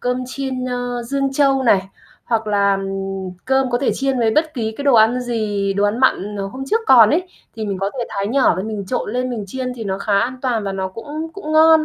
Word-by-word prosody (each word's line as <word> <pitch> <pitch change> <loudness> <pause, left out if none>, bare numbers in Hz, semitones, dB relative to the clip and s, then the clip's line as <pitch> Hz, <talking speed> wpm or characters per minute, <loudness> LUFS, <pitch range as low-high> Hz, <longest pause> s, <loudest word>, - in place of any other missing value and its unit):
cơm 250 +1 -1
chiên, 260 -1 -4
ơ, 245 -1 -3
Dương 275 +3 -1
Châu 270 -1 +3
này, 195 -6 +3 0.4
hoặc 225 -2 -1
là, 200 -1 +2
ừm, 195 -1 -4
cơm 265 -1 +1
có 245 - +1
thể 270 - +1
chiên 270 -1 0
với 230 -2 +2
bất 310 +6 +1
ký 220 -4 -2
cái 285 - -5
đồ 280 -3 +4
ăn 225 +3 +5
gì, 215 -5 -1
đồ 200 +1 +1
ăn 205 +3 +1
mặn, 210 -5 +1
ờ, 195 -1 -3
hôm 260 +7 -6
trước 450 +10 +1
còn 230 -5 +7
ấy, 330 +5 +2 0.3
thì 220 -1 -3
mình 200 -2 -3
có 195 +1 -1
thể 240 - -1
thái 200 -1 -3
nhỏ 255 +1 +3
lên, 190 +4 -3
mình 210 -2 -4
trộn 210 0 -2
lên 250 +1 -1
mình 225 -4 -4
chiên 255 +5 -4
thì 225 - -6
nó 190 -1 -2
khá 200 -1 +1
an 250 +5 -1
toàn 240 -4 0
và 195 - -2
nó 190 -1 -2
cũng 295 +11 -6
cũng 315 -5 -6
ngon. 315 0 +6
240 Hz, 255 wpm, -19 LUFS, 200-265 Hz, 0.4 s, còn